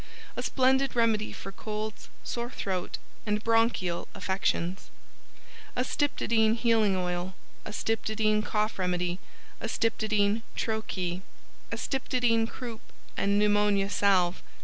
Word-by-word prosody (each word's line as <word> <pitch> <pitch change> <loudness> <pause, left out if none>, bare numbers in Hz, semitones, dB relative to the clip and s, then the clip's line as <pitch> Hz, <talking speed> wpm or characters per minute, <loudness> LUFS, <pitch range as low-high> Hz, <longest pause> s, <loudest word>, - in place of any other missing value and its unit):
A - - -2
splendid 265 +1 +2
remedy 225 -2 +2
for 195 - -7
colds, 215 +1 -5
sore 235 0 -3
throat, 185 -7 -3 0.3
and 210 0 -1
Bronchial 225 -6 +2
Affections. 190 -1 -1 0.9
Astyptodyne 235 -4 +2
Healing 225 -4 +3
Oil, 180 0 -2 0.3
Astyptodyne 215 0 +1
Cough 210 -1 -1
Remedy, 180 0 0 0.4
Astyptodyne 220 -1 +1
"Tro 220 -1 0
Ke," 180 -3 -3 0.5
Astyptodyne 245 -4 +1
Croup 235 -4 -7 0.3
and 200 +1 +2
Pneumonia 205 -1 +3
Salve. 185 -4 +3
215 Hz, 100 wpm, -29 LUFS, 195-230 Hz, 0.9 s, Healing